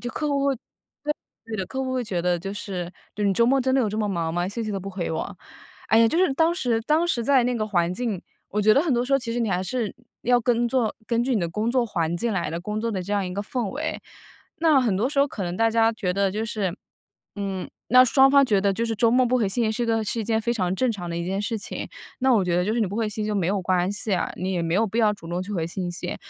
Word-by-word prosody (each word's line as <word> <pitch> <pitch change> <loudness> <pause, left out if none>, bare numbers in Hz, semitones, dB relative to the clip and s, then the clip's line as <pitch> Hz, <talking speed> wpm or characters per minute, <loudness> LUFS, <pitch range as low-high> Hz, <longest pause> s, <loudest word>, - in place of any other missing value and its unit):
就 245 - -4
客 305 - -3
户 280 -1 +1
会 275 - +2
对， 245 - -28 0.9
对 - - -1
的。 190 - -2
客 265 - -4
户 260 - -2
会 255 - 0
觉 185 -5 -2
得 180 0 +1
就 195 +3 -5
是 185 -4 -5 0.2
你 205 -2 +2
周 235 +4 +3
末 270 +1 +3
真 260 +1 +1
的 270 - +4
有 220 - +1
这 215 - -4
么 210 - 0
忙 170 -4 -2
吗？ 175 +1 0
信 225 +2 -4
息 215 - -3
都 195 - -2
不 195 +2 -6
回 180 -2 -3
我。 165 +3 -4 0.5
哎 220 - +5
呀， 230 - +6
就 330 - 0
是 365 -8 +3
当 325 +3 +3
时 240 -10 0
当 310 +6 +2
时 245 -8 0
在 265 -2 +4
那 250 0 +1
个 220 - -1
环 175 -4 +1
境， 220 -5 -2 0.3
我 210 - 0
觉 215 +1 +5
得 280 - +4
很 320 -6 +1
多 240 0 +1
时 275 - -3
候， 275 - +5
其 235 -3 -4
实 240 - -2
你 225 - 0
还 180 0 0
是 230 +1 -2 0.3
要 245 0 +3
跟 240 0 +2
做 235 -3 +1
根 235 0 +1
据 255 0 0
你 210 - +1
的 170 - -1
工 215 +6 -1
作 250 -1 +2
环 170 -5 -1
境 235 +4 -1
来 190 - -1
的 170 +2 -3
工 210 +3 -3
作 230 +1 -1
的 190 -3 -2
这 200 +3 -5
样 200 -2 +1
一 180 - -5
个 200 - -2
氛 240 -1 -3
围， 310 +4 -3 0.6
那 315 -4 +5
很 225 -7 +1
多 230 +6 +1
时 280 0 -3
候 280 - +3
可 200 -7 -5
能 175 +1 -3
大 225 0 +3
家 225 0 +3
觉 185 -5 -2
得 195 0 +1
就 215 +3 -2
是， 200 -5 -2 0.6
嗯， 195 -2 -3 0.2
那 255 +1 +8
双 265 +2 +5
方 280 0 +6
觉 205 -4 +3
得 200 0 +2
就 230 +4 -1
是 225 - -1
周 230 +1 +3
末 255 +1 +4
不 255 - +2
回 210 -4 +1
信 235 +5 0
息 220 - +1
是 240 +2 -2
一 - - -3
个 225 -1 +1
是 225 +2 -2
一 - - -3
件 225 0 +1
非 235 +2 0
常 185 -5 0
正 255 +3 +1
常 180 -5 -6
的 170 - -3
一 170 - -2
件 195 +2 -2
事 225 +2 -2
情， 210 - -6 0.3
那 260 0 +4
我 205 - +3
觉 175 -1 +1
得 180 - +2
就 210 - 0
是 240 - +1
你 215 - +2
不 200 +3 -5
回 225 -2 0
信 210 +1 -4
息 - - -2
就 210 - -1
没 185 -4 +1
有 200 -1 0
关 180 +1 +1
系 205 0 -2
啊， 180 - -1
你 185 +2 -2
也 175 -2 -1
没 165 +1 -1
有 225 +3 +3
必 220 +3 -3
要 215 -2 +4
主 180 -5 -12
动 175 +1 -2
去 205 +3 -6
回 165 -4 -1
信 175 +1 -4
息。 175 0 -5
215 Hz, 340 characters per minute, -24 LUFS, 190-245 Hz, 0.9 s, 那